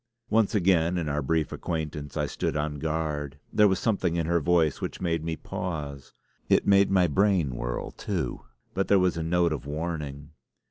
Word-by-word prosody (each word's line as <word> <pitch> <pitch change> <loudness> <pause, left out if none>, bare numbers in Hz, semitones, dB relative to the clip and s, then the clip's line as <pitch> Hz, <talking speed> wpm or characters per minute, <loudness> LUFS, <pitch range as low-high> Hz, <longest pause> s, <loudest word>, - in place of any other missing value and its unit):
Once 110 -1 +3
again 90 -3 +3
in 85 -3 -2
our 75 0 0
brief 80 +2 0
acquaintance 75 -3 -4
I - - +1
stood - - -2
on 75 0 -2
guard. 75 -2 -2 0.2
There 105 -1 +6
was 95 -1 +2
something 95 -6 0
in 85 -2 0
her 85 +1 +2
voice 80 -2 +2
which - - -4
made 85 -3 -1
me 80 0 -2
pause. 75 -5 -5 0.4
It - - +4
made 100 0 +5
my 95 -2 +4
brain 90 -4 +2
whirl, - - -3
too, - - -3 0.3
but 95 - 0
there 100 - +5
was 90 -2 +2
a 85 - -2
note 85 0 +2
of 70 -2 -6
warning. 75 -2 -4
80 Hz, 185 wpm, -27 LUFS, 75-90 Hz, 0.4 s, There